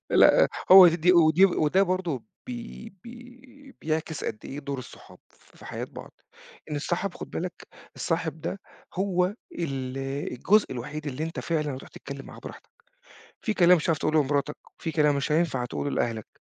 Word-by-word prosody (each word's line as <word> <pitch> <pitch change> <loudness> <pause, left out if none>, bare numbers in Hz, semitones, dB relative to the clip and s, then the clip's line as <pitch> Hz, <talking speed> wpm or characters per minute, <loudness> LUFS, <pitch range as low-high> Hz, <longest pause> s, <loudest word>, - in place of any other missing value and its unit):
لأ - - +6 0.2
هو 190 -1 +11
دي 170 +2 +3
ودي 170 +1 +6
وده 180 0 +2
برضه 180 - -1 0.2
بي 120 - -8
بي 250 +3 -14
بيعكس 155 0 -3
قدّ - - -3
إيه 140 - -7
دور 140 -1 -5
الصُحاب 125 - -12
في - - -20
حياة - - -5
بعض. - - -11 0.6
إن 150 - -2
الصاحب 175 +5 -2
خُد - - -9
بالك 175 +1 -3 0.4
الصاحب 160 -2 -2
ده 195 - -4 0.3
هو 185 0 0 0.2
ال 135 -5 -4 0.3
الجزء 205 - +2
الوحيد 150 +5 -6
اللي 145 +2 -3
أنت 165 - -5
فعلًا 155 -3 -1
رايح 130 -1 -8
تتكلم 140 0 -9
معاه - - -12
براحتك، - - -11 0.7
في 220 - -1
كلام 180 -2 +6
مش 155 - -4
هتعرف 165 -2 +2
تقوله 155 +1 +2
لمراتك، 145 +1 -1 0.2
في 165 - -3
كلام 150 -2 +3
مش 140 +2 -2
هينفع 150 -6 +1
تقُوله 145 - -3
لأهلك، 115 -4 -2
160 Hz, 165 wpm, -26 LUFS, 140-180 Hz, 0.7 s, هو